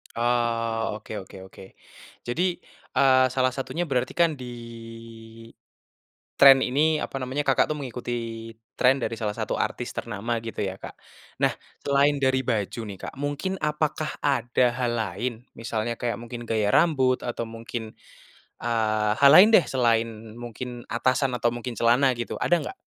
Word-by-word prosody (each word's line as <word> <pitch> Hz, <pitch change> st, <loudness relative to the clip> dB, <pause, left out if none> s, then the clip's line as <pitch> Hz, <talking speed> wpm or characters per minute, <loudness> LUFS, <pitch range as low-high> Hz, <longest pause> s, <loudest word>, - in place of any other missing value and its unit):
Oh, 115 Hz, -2 st, 0 dB
oke 105 Hz, -2 st, -7 dB
oke 95 Hz, -, -13 dB
oke. 95 Hz, -, -14 dB, 0.6 s
Jadi, 175 Hz, +9 st, 0 dB, 0.4 s
eee, 130 Hz, -1 st, +6 dB
salah 130 Hz, 0 st, +1 dB
satunya 165 Hz, +6 st, -3 dB
berarti 130 Hz, -3 st, -1 dB
kan 170 Hz, -3 st, +2 dB
di 125 Hz, -2 st, -8 dB, 1.8 s
tren 135 Hz, -1 st, +8 dB
ini 150 Hz, +4 st, +2 dB
apa -, -, -6 dB
namanya, 130 Hz, +3 st, -2 dB
Kakak 135 Hz, -2 st, +3 dB
tuh -, -, -1 dB
mengikuti 125 Hz, -3 st, -6 dB, 0.7 s
tren 130 Hz, +2 st, +4 dB
dari 115 Hz, -, -2 dB
salah 105 Hz, -2 st, -2 dB
satu -, -, -2 dB
artis -, -, -2 dB
ternama 115 Hz, +1 st, -3 dB
gitu 115 Hz, -2 st, -4 dB
ya, 95 Hz, -1 st, -3 dB
Kak. -, -, -9 dB, 0.5 s
Nah, -, -, +4 dB, 0.3 s
selain 140 Hz, +1 st, +3 dB
dari 130 Hz, 0 st, +3 dB
baju 115 Hz, -2 st, -2 dB
nih, 100 Hz, -2 st, -8 dB
Kak, -, -, -7 dB
mungkin 145 Hz, +7 st, -3 dB
apakah 150 Hz, 0 st, -1 dB
ada 125 Hz, -3 st, +2 dB
hal 125 Hz, -2 st, -1 dB
lain 110 Hz, +3 st, -2 dB, 0.3 s
misalnya 115 Hz, 0 st, -2 dB
kayak 120 Hz, -1 st, -1 dB
mungkin 120 Hz, 0 st, -7 dB
gaya 110 Hz, -2 st, +1 dB
rambut, 130 Hz, -6 st, +3 dB
atau 120 Hz, -1 st, -3 dB
mungkin, 115 Hz, 0 st, -7 dB, 0.7 s
eee, 110 Hz, -2 st, +1 dB
hal 140 Hz, 0 st, +7 dB
lain 185 Hz, +9 st, +9 dB
deh, 185 Hz, -, +8 dB
selain 115 Hz, -3 st, 0 dB
mungkin 120 Hz, +1 st, -7 dB
atasan 130 Hz, +3 st, +1 dB
atau 120 Hz, -, +2 dB
mungkin 120 Hz, 0 st, -5 dB
celana 120 Hz, +4 st, +4 dB
gitu, 120 Hz, -1 st, -5 dB
ada 175 Hz, -, +3 dB
nggak? -, -, -6 dB
120 Hz, 150 wpm, -25 LUFS, 115-135 Hz, 1.8 s, lain